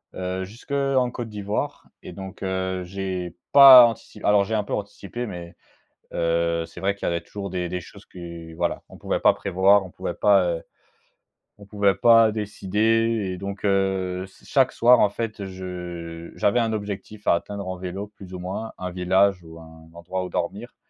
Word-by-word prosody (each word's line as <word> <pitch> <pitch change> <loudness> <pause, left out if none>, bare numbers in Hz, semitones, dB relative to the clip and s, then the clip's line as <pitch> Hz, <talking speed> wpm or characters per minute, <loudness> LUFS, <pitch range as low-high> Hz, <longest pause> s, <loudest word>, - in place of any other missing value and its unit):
heu, 95 0 -3
jusqu'en 130 +4 -1
Côte 120 -1 -5
d'Ivoire 105 -1 -4 0.2
et 90 - -9
donc 95 +1 -9
heu, 95 -1 -2
j'ai 95 -1 -4 0.2
pas 135 -3 +11
antici 115 -2 -5
alors 105 -1 +4
j'ai 110 +3 -2
un 105 - +1
peu - - -11
anticipé, 105 +3 -5
mais 85 -4 -8 0.6
heu, 85 0 0
c'est 85 +2 -12
vrai 100 +2 0
qu'il 100 - -7
y - - +1
avait 85 - 0
toujours 100 +4 -7
des 90 -1 -3
des 90 +1 -4
choses - - -15
que 85 -2 -10
voilà, 85 +1 -2
on - - -14
pouvait - - -2
pas - - +5
prévoir, 95 +2 +3
on 90 - -11
pouvait - - -5
pas, 100 -3 +4
heu, 85 -1 -2 1.0
on 100 - -14
pouvait 100 -1 +1
pas 115 -1 +6
décider 105 0 0
et - - -8
donc 100 +2 -6
heu, 95 -2 0
s 95 0 -13
chaque 135 -2 +3
soir 120 +1 +5
en 105 - +5
fait 105 -2 -5
je 90 -3 -7
j'avais 120 +4 +2
un 115 -1 0
objectif 105 0 -6
à - - +5
atteindre 100 +3 -4
en 95 0 -4
vélo 95 +2 -5
plus 100 -3 -14
ou - - -5
moins, 95 +5 -5
un 90 -1 -5
village 95 +1 +2
ou 80 0 -12
un 80 0 -15
endroit 85 +2 -4
où - - -5
dormir, - - -4
95 Hz, 190 wpm, -24 LUFS, 90-105 Hz, 1.0 s, pas